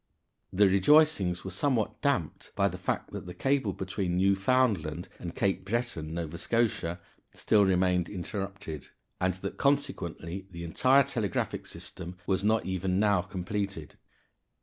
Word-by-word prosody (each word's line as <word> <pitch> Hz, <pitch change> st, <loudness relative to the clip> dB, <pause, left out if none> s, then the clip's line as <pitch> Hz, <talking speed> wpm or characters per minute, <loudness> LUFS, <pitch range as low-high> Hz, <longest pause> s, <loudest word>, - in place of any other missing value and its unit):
The 100 Hz, +2 st, +5 dB
rejoicings 95 Hz, -, +4 dB
were 95 Hz, -, -4 dB
somewhat 115 Hz, +3 st, 0 dB
damped -, -, -1 dB
by -, -, +3 dB
the -, -, -5 dB
fact -, -, -2 dB
that -, -, -6 dB
the 90 Hz, -, -7 dB
cable 135 Hz, -6 st, +1 dB
between 95 Hz, -1 st, -2 dB
Newfoundland 95 Hz, -4 st, +2 dB
and 85 Hz, -1 st, -6 dB
Cape 95 Hz, -1 st, 0 dB
Breton 95 Hz, -7 st, -2 dB
(Nova 85 Hz, -1 st, -4 dB
Scotia) 100 Hz, -7 st, 0 dB, 0.4 s
still 105 Hz, -1 st, +3 dB
remained 90 Hz, -2 st, +2 dB
interrupted, 95 Hz, -5 st, -5 dB, 0.3 s
and 90 Hz, 0 st, +1 dB
that 95 Hz, +1 st, -6 dB
consequently 95 Hz, -, -1 dB
the 85 Hz, -2 st, -8 dB
entire 130 Hz, +11 st, +4 dB
telegraphic 115 Hz, -8 st, -2 dB
system 90 Hz, 0 st, -7 dB
was 95 Hz, 0 st, 0 dB
not 110 Hz, +1 st, +2 dB
even 95 Hz, 0 st, 0 dB
now 100 Hz, -3 st, +3 dB
completed. 95 Hz, -, -4 dB
95 Hz, 135 wpm, -29 LUFS, 90-110 Hz, 0.4 s, The